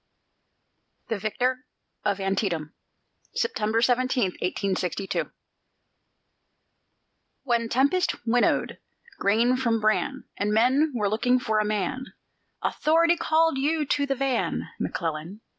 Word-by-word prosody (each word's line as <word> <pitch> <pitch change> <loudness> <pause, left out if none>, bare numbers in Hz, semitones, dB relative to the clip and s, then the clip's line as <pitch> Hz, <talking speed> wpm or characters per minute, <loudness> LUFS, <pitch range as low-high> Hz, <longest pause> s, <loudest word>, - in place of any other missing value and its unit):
THE 225 - -1
VICTOR 250 +5 -1 0.4
OF 200 - +1
ANTIETAM 190 -5 -1 0.6
[September 225 - 0
17, 255 0 +2 0.2
1862] 190 0 -1 2.2
When 235 -3 0
tempest 280 +10 +2
winnowed 240 +1 +1 0.4
grain 230 +5 +3
from 230 -3 +1
bran, 215 +6 0
And 205 +1 0
men 260 +8 +3
were 210 -3 +1
looking 235 +5 +2
for 220 -4 0
a 215 - +1
man, 215 +5 -2 0.6
Authority 335 +2 +3
called 325 -3 +2
you 305 +2 +1
to 285 +1 0
the 275 - 0
van, 270 -2 -1
McClellan! 165 +5 -4
235 Hz, 105 wpm, -26 LUFS, 210-270 Hz, 2.2 s, grain